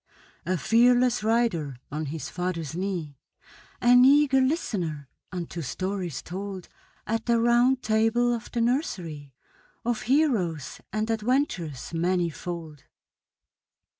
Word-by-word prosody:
A 185 0 +1
fearless 245 +3 +3
rider 215 - +1
on 150 +1 -3
his 155 +2 -5
father's 170 -4 -3
knee, 175 -7 -4 0.6
An 245 +1 +7
eager 275 0 +5
listener 180 - -1 0.2
unto 175 -2 -5
stories 180 +3 -3
told 190 0 -6 0.4
At 225 +2 -2
the 235 -1 +3
Round 240 +2 +3
Table 225 +2 +2
of 235 -1 -5
the 235 - -1
nursery, 170 - -2 0.5
Of 235 -2 0
heroes 220 - +1
and 215 +2 -1
adventures 215 - -1
manifold. 170 -3 -2
200 Hz, 105 wpm, -26 LUFS, 165-240 Hz, 0.6 s, An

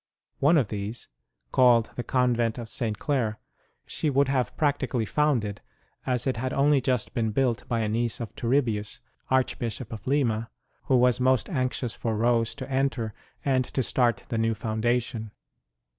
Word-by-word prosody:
One 155 +4 +5
of 125 -8 +2
these, 105 +3 -4 0.4
called 120 -3 +5
the - - -2
Convent 120 -3 +1
of 120 -2 -5
St. 110 -1 -2
Clare, 120 -6 -1 0.5
she 155 - -1
would 140 0 +2
have 130 -5 0
prac 145 -2 +2
tically 125 -5 -1
founded, 120 -9 0 0.5
as 125 -2 +1
it 130 -3 0
had 130 +2 -2
only 140 0 +3
just 125 -3 -1
been 115 -2 0
built 120 +1 0
by 115 -1 0
a 110 - 0
niece 115 +2 -1
of 115 -3 -6
Turibius, 115 -4 0 0.3
Archbishop 125 -2 -1
of 110 +1 -9
Lima, 115 -5 +1 0.4
who 130 - +4
was 125 0 +4
most 130 - +2
anxious 130 -4 -1
for 110 -2 -2
Rose 115 0 +2
to 130 -3 -6
enter, 135 -5 -1 0.3
and 130 -2 +3
to 130 +1 -2
start 120 -5 +1
the 115 -3 -1
new 115 0 +1
foundation. 110 +1 -1
120 Hz, 165 wpm, -27 LUFS, 110-130 Hz, 0.5 s, One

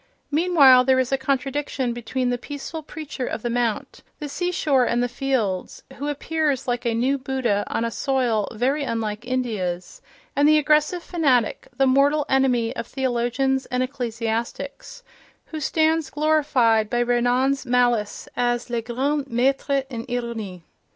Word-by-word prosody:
Meanwhile, 290 -6 +6
there 260 0 +4
is 260 0 0
a - - +4
contradiction 270 -1 -1
between 245 +2 -2
the 245 - -2
peaceful 290 +4 -6
preacher 300 -4 -6
of 220 - -4
the 240 - -1
mount, 235 -2 -2 0.2
the 300 - -5
sea 355 +5 -2
shore 280 -7 +2
and 240 0 +1
the - - +1
fields, 245 -7 -2
who 285 - -4
appears 295 -2 -1
like 245 -1 -1
a 230 - +1
new 265 +4 +1
Buddha 255 -6 0
on 230 - -1
a 230 - -2
soil 245 -5 0
very 265 +6 0
unlike 225 -2 -3
India's, 220 - -3 0.3
and 285 +1 +4
the 310 0 +6
aggressive 305 +3 +2
fanatic, 265 -11 +1
the 270 - +4
mortal 280 +3 +3
enemy 250 -4 +2
of 235 - -5
theologians 265 +1 0
and 250 0 0
ecclesiastics, 235 - -4 0.4
who 315 - -6
stands 315 0 +1
glorified 270 -8 +2
by 240 - 0
Renan's 245 +3 +1
malice 240 -4 +1
as 240 0 -1
"le 235 -1 0
grand 270 +5 -1
maître 270 +3 +1
en 230 -2 -4
ironie." 225 -7 -4
255 Hz, 150 wpm, -23 LUFS, 235-280 Hz, 0.4 s, Meanwhile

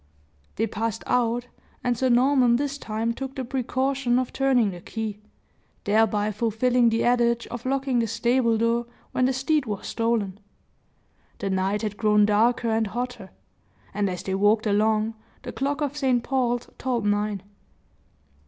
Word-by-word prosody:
They 225 - +1
passed 225 +1 -3
out, 240 0 +1 0.4
and 245 -1 +1
Sir 260 +2 +1
Norman 250 0 +4
this 280 +2 -2
time 225 0 -2
took 270 +2 -6
the 260 - -3
precaution 260 0 0
of 255 -1 -1
turning 255 -6 +2
the 175 -1 -9
key, 215 0 -5 0.6
thereby 210 0 +2
fulfilling 235 +3 +2
the 225 0 0
adage 235 -1 +2
of 240 +1 -6
locking 270 -2 0
the 230 - +1
stable 230 +1 +1
door 230 +1 +1 0.2
when 255 - +1
the 260 - +2
steed 270 +1 0
was 205 -2 -4
stolen. 225 -4 -1 1.0
The 195 -3 -3
night 190 +3 0
had 210 -1 -3
grown 210 -1 +4
darker 230 +3 +2
and 220 0 +1
hotter; 240 -2 -5 0.6
and 200 0 0
as 180 -1 -5
they 190 - -3
walked 205 +3 +3
along, 215 +1 +2 0.3
the - - -5
clock 280 +2 -2
of 290 -1 -1
St. 260 -5 +1
Paul's 245 -3 0
tolled 240 -4 -1
nine. 205 -1 0
235 Hz, 155 wpm, -25 LUFS, 215-255 Hz, 1.0 s, Norman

